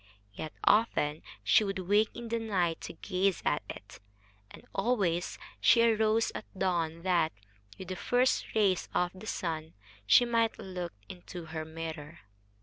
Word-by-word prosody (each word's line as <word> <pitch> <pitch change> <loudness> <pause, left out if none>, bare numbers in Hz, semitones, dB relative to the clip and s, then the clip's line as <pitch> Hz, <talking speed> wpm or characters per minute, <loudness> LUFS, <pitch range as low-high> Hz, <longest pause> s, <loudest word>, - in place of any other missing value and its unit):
Yet 155 +10 -6
often 160 -9 +3 0.2
she - - +5
would 195 -1 -2
wake 205 +4 +2
in 235 -1 -7
the 230 0 0
night 185 -7 0
to - - -6
gaze 185 +2 0
at - - +2
it, - - -9 0.5
and - - -14
always 195 -5 0 0.2
she 230 0 +6
arose 220 0 +3
at - - -6
dawn 170 -3 0
that, 175 -4 +2 0.5
with 190 - -8
the 185 - -3
first 245 +6 +1
rays 200 -4 +2
of 180 0 +2
the 190 +3 -11
sun, 160 -5 -3 0.3
she 245 - +7
might 230 -1 +1
look 180 -2 -5
into 175 -1 -9
her 160 -1 -3
mirror. 160 -1 -7
185 Hz, 150 wpm, -31 LUFS, 165-220 Hz, 0.5 s, she